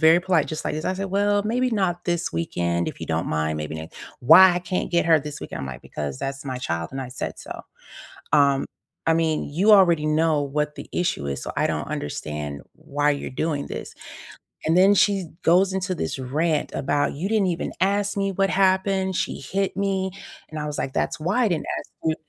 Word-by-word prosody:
very 160 +2 +6
polite 180 -4 +2
just 155 - -5
like - - -1
this, 155 - -4
I - - +1
said, 195 +1 -3
"Well, 205 +1 +2
maybe 250 +4 +1
not 190 -5 0
this 175 -1 -1
weekend. 85 +1 -1
If - - -9
you - - -5
don't - - -1
mind, 80 0 -1
maybe 75 0 -4
ne" 80 0 -6 0.3
"Why 185 +9 +8
I - - +1
can't 180 +1 -2
get 170 -1 +2
her 160 -2 +6
this 150 0 -7
weekend?" - - -6
I'm 70 - -4
like, 65 -1 -7
"Because 70 -3 -5
that's 135 0 -4
my 130 -2 -4
child, 85 -9 -3
and 135 - -4
I 130 - -5
said 125 - -5
so." - - -8 0.7
Um, 140 -2 +4 0.4
"I 165 - +5
mean, 160 -2 +1
you 185 +9 +3
already 170 -6 +5
know 155 -1 +2
what 150 +1 -2
the - - -8
issue 175 - -1
is, 70 -1 -3
so - - -4
I - - +2
don't - - -3
understand 75 -1 -4
why 145 -2 0
you're 140 - -2
doing 145 +1 -2
this." - - -6 0.7
And 160 +2 +3
then 195 +2 +6
she 195 -3 +2 0.2
goes 185 +3 +4
into 190 0 -1
this 80 - -3
rant 150 +4 0
about, 145 +1 0
"You 165 +7 -2
didn't 215 -3 +2
even 170 -2 -2
ask 200 +1 +1
me 195 0 0
what 195 +1 +1
happened, 190 0 +2
she - - -2
hit 195 0 -2
me." 195 -1 0 0.4
And 155 - -7
I 150 - -3
was 150 - -4
like, 135 - -3
"That's 170 - -1
why 190 +11 +1
I - - +4
didn't 160 -4 -1
ask - - -12 0.2
you" 160 - +2
160 Hz, 220 wpm, -24 LUFS, 135-190 Hz, 0.7 s, Why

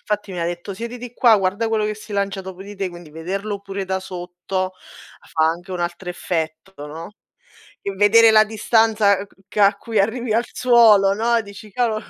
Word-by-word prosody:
Infatti 210 -2 -3
mi 180 - -5
ha 170 - 0
detto: 175 +3 -4
"Siediti 240 +3 -7
qua, 235 -3 +5
guarda 195 +4 0
quello 220 -1 0
che 215 - -2
si 210 0 -11
lancia 200 -1 -1
dopo 190 -1 -9
di 205 +1 -10
te", 195 -1 -2
quindi 175 -2 -12
vederlo 195 +6 -4
pure 195 -1 -5
da 190 0 -1
sotto, 185 0 -4 0.6
fa 160 0 +3
anche 175 +3 -3
un 180 - -4
altro 175 +1 -4
effetto, 160 -1 -4
no? 165 +6 -9 0.7
E 200 - -2
vedere 215 +3 +6
la 215 0 +6
distanza 215 -2 +2
ch - - -27
che 210 - -5
a 200 0 +5
cui 220 +1 -2
arrivi 225 +2 0
al 235 +2 +2
suolo, 225 -6 +5
no, 230 +3 +1
dici: 200 0 -12
"Cavolo, 220 -1 0
200 Hz, 195 wpm, -21 LUFS, 185-220 Hz, 0.7 s, vedere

